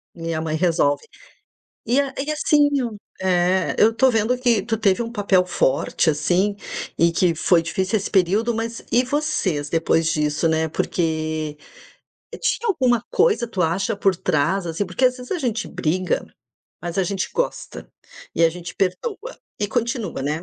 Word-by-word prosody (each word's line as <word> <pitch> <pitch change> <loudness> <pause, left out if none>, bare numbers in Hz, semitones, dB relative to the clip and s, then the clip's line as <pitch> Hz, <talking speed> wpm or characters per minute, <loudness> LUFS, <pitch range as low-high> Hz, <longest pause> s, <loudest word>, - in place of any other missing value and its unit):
E 165 0 -4
a 160 - -2
mãe 155 -1 -2
resolve. 160 -3 +1 0.8
E 245 +5 +2
a 275 -1 -4
e 285 +3 -2
assim 295 -1 +3 0.5
É, 185 0 +1
eu 225 +1 +5
tô 265 +3 +4
vendo 230 +1 +1
que 240 -5 +2
tu 225 - -2
teve 200 -1 +2
um 230 0 -4
papel 200 -4 +2
forte 150 -1 +1
assim. 180 +7 +1 0.4
E 170 0 +4
que 170 0 +2
foi 170 +1 +3
difícil 190 +5 -1
esse 200 - -4
período. 205 +5 +2
Mas 230 0 -4
e 245 +2 +4
vocês 255 - -1
depois 165 0 +1
disso, 150 0 +1
né. 160 0 +1
Porque 155 -2 -2 0.8
tinha 470 - 0
alguma 250 - +2
coisa, 420 - +2
tu 195 -5 -2
acha 185 +5 0
por 195 -1 +2
trás, 175 +4 0
assim? 165 +5 -2
Porque 185 +8 -1
às 250 0 0
vezes 250 0 -7
a 370 - -1
gente 235 -6 -2
briga, 180 +3 -1 0.6
mas 175 +2 -4
a - - +4
gente 195 +1 -2
gosta - - -3 0.5
e 165 - +3
a 165 - +4
gente 175 0 -8
perdoa 415 - -3 0.2
e 205 - +1
continua, 235 -4 -2
né. 150 +4 -2
190 Hz, 165 wpm, -22 LUFS, 165-235 Hz, 0.8 s, eu